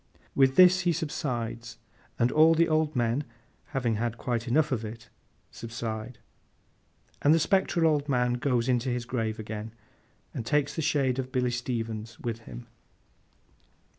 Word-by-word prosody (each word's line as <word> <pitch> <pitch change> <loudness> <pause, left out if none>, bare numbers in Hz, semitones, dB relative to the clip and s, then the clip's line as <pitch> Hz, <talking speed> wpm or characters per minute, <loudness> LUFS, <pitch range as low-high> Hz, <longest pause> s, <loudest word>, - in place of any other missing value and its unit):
With 135 -1 +3
this 185 0 +7
he 175 -1 +1
subsides, 120 -7 -4 0.4
and 120 +1 +2
all 160 +2 +6
the 165 +1 +3
old 155 -1 +1
men 120 +3 +1 0.4
(having 120 -5 -1
had 115 +1 -2
quite 120 -1 -2
enough 150 +5 +2
of 115 -4 -1
it) 115 +2 -8 0.4
subside, 115 0 -6 1.0
and 150 +3 +5
the - - +3
spectral 175 -1 +2
old 150 -2 +2
man 125 -2 +2
goes 125 -1 0
into 125 0 +1
his 120 -1 -2
grave 115 -3 -2
again, 110 +1 -6 0.6
and - - -4
takes 145 +4 0
the 160 - -1
shade 135 -4 +1
of 130 0 -4
Billy 125 -1 0
Stevens 115 -2 -4
with 115 -1 -4
him. 120 +1 -10
125 Hz, 150 wpm, -28 LUFS, 115-145 Hz, 1.0 s, this